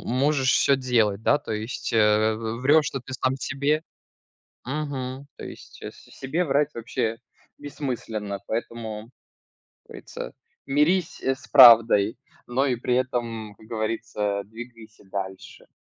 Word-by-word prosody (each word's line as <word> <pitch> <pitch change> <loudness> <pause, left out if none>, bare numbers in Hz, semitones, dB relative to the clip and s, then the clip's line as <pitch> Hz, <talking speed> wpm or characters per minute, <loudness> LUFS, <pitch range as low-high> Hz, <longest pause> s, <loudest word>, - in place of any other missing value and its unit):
можешь 135 +1 +2
всё 140 - +4
делать, 115 -6 +1
да, - - +3
то 145 - -6
есть, 110 +4 -4
э, 110 0 +4
в 115 +1 -5
врёшь, 145 +2 +4
то 135 - -4
ты 130 - -10
сам 130 +1 0
себе, 145 +3 -1 0.8
мгм. 135 -1 -4
То - - -8
есть - - -12
с - - -10
себе 160 +7 -1
врать 145 0 +1
вообще 115 -1 -3 0.4
бессмысленно, 115 -8 -5
поэтому, 110 -1 -5 0.7
как - - -41
говорится, - - -8 0.3
мирись 165 +6 +1
с 135 +1 -2
правдой, 115 -5 +7 0.3
но 130 +3 0
и 125 -3 +1
при 125 +1 -1
этом, 115 -4 -2
как 110 - -16
говорится, 110 -2 -2
двигайся 115 -1 -12
дальше. 95 0 -7
120 Hz, 135 wpm, -25 LUFS, 110-135 Hz, 0.8 s, правдой